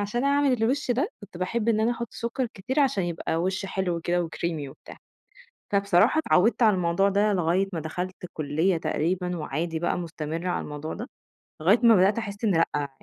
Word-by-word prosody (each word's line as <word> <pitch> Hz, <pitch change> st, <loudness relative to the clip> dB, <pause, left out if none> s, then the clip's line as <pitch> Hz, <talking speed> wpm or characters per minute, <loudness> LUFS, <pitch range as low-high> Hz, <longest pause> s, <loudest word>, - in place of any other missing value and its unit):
عشان 225 Hz, +6 st, -1 dB
أعمل 280 Hz, -1 st, +3 dB
الوِش 250 Hz, +4 st, 0 dB
ده 280 Hz, -, +1 dB
كنت 205 Hz, -3 st, -12 dB
باحب 215 Hz, +5 st, -1 dB
إن 220 Hz, -1 st, +3 dB
أنا 225 Hz, +2 st, +2 dB
أحُط 235 Hz, -1 st, -3 dB
سُكّر 235 Hz, +2 st, -2 dB
كتير 255 Hz, +9 st, -1 dB
عشان 260 Hz, -10 st, +2 dB
يبقى 170 Hz, -1 st, -2 dB
وِش 190 Hz, +4 st, -1 dB
حلو 190 Hz, -3 st, -1 dB
وكده 175 Hz, +1 st, 0 dB
وcreamie 160 Hz, -4 st, -3 dB
وبتاع. -, -, -13 dB, 0.8 s
فبصراحة 200 Hz, -, +3 dB
اتعوّدت 235 Hz, -5 st, +3 dB
على 215 Hz, -3 st, +5 dB
الموضوع 180 Hz, +2 st, +2 dB
ده 205 Hz, +1 st, +2 dB
لغاية 185 Hz, +2 st, +1 dB
ما 165 Hz, -, -2 dB
دخَلت 180 Hz, +4 st, -5 dB
الكُلّية 160 Hz, +2 st, 0 dB
تقريبًا 180 Hz, +3 st, -1 dB
وعادي 160 Hz, +2 st, -3 dB
بقى 175 Hz, -, 0 dB
مستمِّرة 165 Hz, 0 st, -4 dB
على -, -, -1 dB
الموضوع 150 Hz, +1 st, -6 dB
ده، 235 Hz, +5 st, -6 dB, 0.5 s
لغاية 195 Hz, +9 st, +5 dB
ما 230 Hz, -2 st, +7 dB
بدأت 195 Hz, +4 st, +4 dB
أحس 205 Hz, -1 st, -5 dB
إن 210 Hz, -, +3 dB, 0.2 s
لأ. 145 Hz, -1 st, -1 dB
190 Hz, 185 wpm, -26 LUFS, 170-225 Hz, 0.8 s, ما